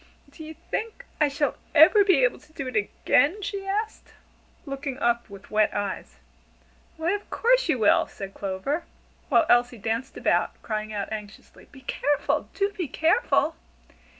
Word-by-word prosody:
"Do 315 - -11
you 315 +1 -9
think 445 +9 -5
I 300 - +4
shall 285 -1 -1 0.2
ever 365 +7 +8
be 370 -10 +4
able 250 - +2
to 300 +1 -23
do 275 - -5
it 255 - -6
again?" 285 - +2
she 390 0 -4
asked, 425 +3 -3 0.5
looking 275 -1 -5
up 235 -3 0
with 200 0 -13
wet 215 0 +2
eyes. 195 - -4 0.8
"Why, 320 +2 0
of 410 0 -4
course - - +2
you 270 - +3
will!" 215 -3 +4
said 195 -1 -8
Clover; 205 - -3 0.4
while 330 - +4
Elsie 240 -1 +3
danced 225 +5 -3
about, - - 0
crying 215 -1 -3
out 205 -1 -4
anxiously: 210 -1 -10
"Be 270 - -14
careful! 290 +2 -1
Do 400 0 0
be 360 -6 -3
careful!" 325 - +2
280 Hz, 160 wpm, -25 LUFS, 215-345 Hz, 0.8 s, ever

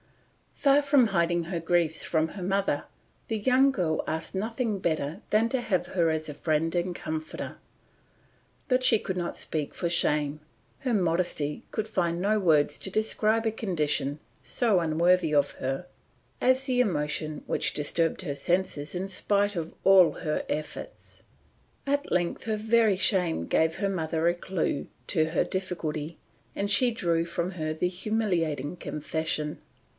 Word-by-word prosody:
Far 280 0 +4
from 280 -4 +4
hiding 170 -3 +1
her 170 0 -3
griefs 165 -1 +1
from 160 -1 0
her 190 +2 -7
mother, 190 -5 0 0.4
the 225 - 0
young 260 +5 +4
girl 170 -11 -1
asked 160 +4 -3
nothing 225 +2 -1
better 160 +1 -2
than 215 +2 +3
to 260 0 -1
have 185 -6 -1
her 170 -3 +1
as 155 0 -2
friend 155 +2 -1
and 175 0 -1
comforter; 155 -1 -5 1.1
but 255 -1 +2
she 230 -4 +5
could 190 -2 -4
not 175 -1 -3
speak 150 -3 -3
for 170 - -2
shame, 150 -3 +2 0.4
her 255 -3 -1
modesty 170 -6 0
could 220 0 -2
find 175 -5 -1
no 210 +2 +2
words 155 -6 +3
to 190 - -2
describe 220 +1 +1
a 225 - +2
condition 150 -9 -1 0.2
so 225 -7 +2
unworthy 170 0 +2
of 145 -1 +3
her, 135 +6 -4 0.5
as 260 +1 +2
the 255 -2 +1
emotion 155 -7 -1
which - - +1
disturbed 165 +4 +1
her 145 -6 -4
senses 170 -1 -1
in 185 +2 -3
spite 205 +1 +1
of 165 -2 -4
all 190 -3 +7
her 155 -1 -2
efforts. 155 0 -6 0.6
At 285 +1 -1
length 175 -1 0
her 220 -1 -1
very 220 -2 +3
shame 180 - +2
gave 160 0 +2
her 200 - -1
mother 165 -3 -1
a 175 - +2
clue 175 -5 -2 0.2
to 160 -4 +2
her 160 - +1
difficulty, 165 -4 -4 0.4
and 200 0 -2
she 240 +4 +4
drew 170 -7 0
from 170 +1 -3
her 155 -4 -3
the 160 +3 0
humiliating 180 -7 -1
confession. 155 -1 -2
175 Hz, 155 wpm, -27 LUFS, 155-205 Hz, 1.1 s, all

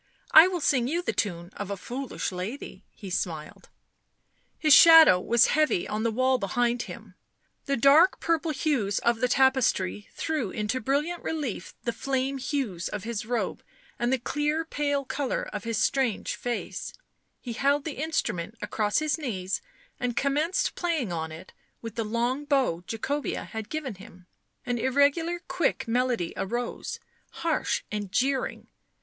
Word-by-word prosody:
I 320 +3 +10
will 360 -2 -2
sing 255 -4 +2
you 340 +6 -1
the - - -1
tune 175 -3 -2
of 205 -1 -5
a 200 - -3
foolish 250 +4 -4
lady," 190 +2 -6
he 195 -3 -9
smiled. 160 -4 -4 0.9
His 305 -2 +5
shadow 325 - +9
was 235 +5 +4
heavy 305 - +2
on 215 +1 -2
the 230 - +1
wall 255 +3 +2
behind 240 +4 0
him; - - -9 0.5
the 275 -2 0
dark 290 +9 +5
purple 330 -1 0
hues 270 -9 0
of 235 -1 +1
the 250 - +2
tapestry 250 -7 +2
threw 300 -11 -2
info 215 +4 -2
brilliant 295 +8 -1
relief 285 - -4
the 235 - -1
flame 270 +2 -1
hues 250 - -2
of 205 -2 -5
his 220 -1 -4
robe 240 -1 -2 0.4
and 240 +1 +1
the 265 - +3
clear 295 +5 -1
pale 285 -3 -1
colour 275 0 -2
of 210 0 -5
his 230 -2 -1
strange 250 -1 +1
face; 240 -1 -4 0.5
he 240 - -6
held 280 +3 +1
the 295 -3 -4
instrument 225 - -2
across 210 -1 -1
his 310 +1 0
knees 195 -10 -3 0.4
and 245 -1 -2
commenced 295 +7 +1
playing 315 - -1
on 160 -1 -3
it 160 +1 -11 0.3
with 230 -2 -6
the 230 - -2
long 240 +6 -1
bow 265 - +1
Jacobea 280 +6 -3
had 220 -2 -7
given 305 -6 -4
him; 185 -2 -14 0.4
an 245 -1 -1
irregular 285 +7 +2
quick 325 -8 0
melody 240 -6 0
arose, 235 +5 -3 0.3
harsh 330 -2 -1
and 205 -2 -4
jeering. 265 +4 0
250 Hz, 155 wpm, -27 LUFS, 210-290 Hz, 0.9 s, I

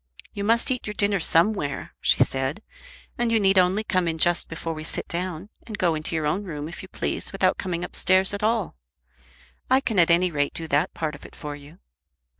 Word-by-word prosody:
"You 200 - -4
must 230 +4 +3
eat 250 -3 -2
your 210 - -5
dinner 200 -1 +1
somewhere," 165 -3 +1
she - - +4
said, 135 +10 -3 0.6
"and 240 -1 +1
you 225 - +4
need 195 -1 +4
only 185 +4 +2
come 185 -5 0
in 165 -1 -1
just 175 +2 +2
before 165 0 -4
we 155 0 -7
sit 160 - -4
down, 180 +2 -4 0.2
and 215 -3 -6
go 175 -4 +2
into 155 +1 -2
your 155 -1 -1
own 180 +7 0
room 150 -6 -5
if 170 - -8
you 190 - -10
please - - -3
without 190 -1 +1
coming 180 -2 -3
upstairs 190 +2 +3
at 200 - -3
all. 215 - 0 0.9
I 260 +1 +5
can 225 -7 0
at 170 - +5
any 175 +1 +3
rate 145 -2 -1
do 165 - -2
that 150 +6 +1
part 155 -2 -2
of 145 - -11
it - - -13
for 145 -1 -6
you." 145 +3 -14
180 Hz, 220 wpm, -24 LUFS, 160-200 Hz, 0.9 s, I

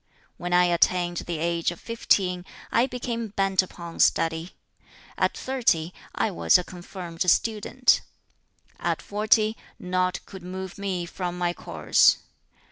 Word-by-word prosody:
"When 175 0 -5
I 180 0 +5
attained 175 0 +2
the 170 -1 -3
age 170 +1 0
of 175 - -7
fifteen, 190 -6 +1 0.3
I 235 +3 +3
became 235 -2 -4
bent 195 -2 +2
upon 170 -2 -9
study. 165 +2 +2 0.6
At - - 0
thirty, 205 -11 0 0.2
I - - 0
was 85 -1 +4
a 180 - -3
confirmed 175 -1 -9
student. 225 +6 +3 0.8
At - - -1
forty, 215 +1 +2 0.2
nought 185 0 -1
could 190 -2 -10
move 185 +1 -7
me 190 -3 -2
from 180 0 -4
my 175 -1 0
course. - - +3
180 Hz, 130 wpm, -25 LUFS, 175-205 Hz, 0.8 s, I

